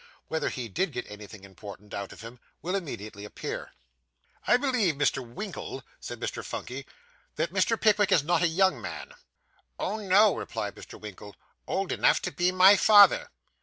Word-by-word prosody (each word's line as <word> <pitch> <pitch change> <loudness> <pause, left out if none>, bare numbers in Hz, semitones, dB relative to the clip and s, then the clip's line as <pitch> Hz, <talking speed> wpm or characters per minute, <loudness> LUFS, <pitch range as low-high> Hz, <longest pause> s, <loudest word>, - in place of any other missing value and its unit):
Whether 160 - -1
he 125 -2 -5
did 150 - -2
get 125 0 -4
anything 105 -1 -11
important 100 +1 -12
out 100 -1 -5
of - - -12
him, 115 +2 -10 0.2
will 180 +3 -2
immediately 110 - -5
appear. 105 - -6 0.7
'I 245 - +6
believe, 250 - +1
Mr. 140 -2 +1
Winkle,' 185 - -7 0.2
said - - -7
Mr. - - -4
Phunky, - - -6 0.5
'that - - -2
Mr. 230 - +1
Pickwick 210 -2 +3
is 150 - +4
not 170 +2 +1
a 175 - +4
young 190 +3 +2
man?' 485 - -7 0.6
'Oh, 215 - -2
no,' 205 0 +4
replied - - -4
Mr. - - -12
Winkle; 105 -1 -10 0.3
'old 195 -1 -1
enough - - +3
to - - -2
be 180 +1 +1
my 185 +2 +7
father. 205 -1 +6
170 Hz, 165 wpm, -27 LUFS, -, 0.7 s, my